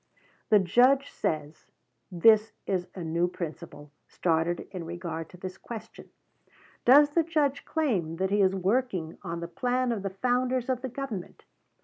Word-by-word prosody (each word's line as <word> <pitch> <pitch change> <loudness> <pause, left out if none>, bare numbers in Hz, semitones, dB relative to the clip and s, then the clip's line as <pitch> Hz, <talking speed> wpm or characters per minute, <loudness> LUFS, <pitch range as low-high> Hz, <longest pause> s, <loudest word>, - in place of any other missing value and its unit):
The 215 - +7
Judge 250 +9 +4
says 155 0 -3 0.4
this 215 +5 +5
is 185 -2 -1
a 180 - -5
new 165 +2 +1
principle 160 -4 -7 0.2
started 170 0 0
in 185 -3 -5
regard 165 -1 -5
to 180 - -14
this 185 +1 -7
question. 225 -2 -9 0.8
Does 290 +4 +7
the 335 - +3
Judge 300 -4 0
claim 205 - -1
that 190 +3 -1
he 205 0 +3
is 190 0 +3
working 190 -4 -1
on 170 -2 -5
the 170 - -4
plan 245 +7 0
of 220 -4 -2
the 195 - -2
founders 250 +5 0
of 255 -1 0
the 260 - -4
government? 240 -8 -6
195 Hz, 155 wpm, -28 LUFS, 170-250 Hz, 0.8 s, The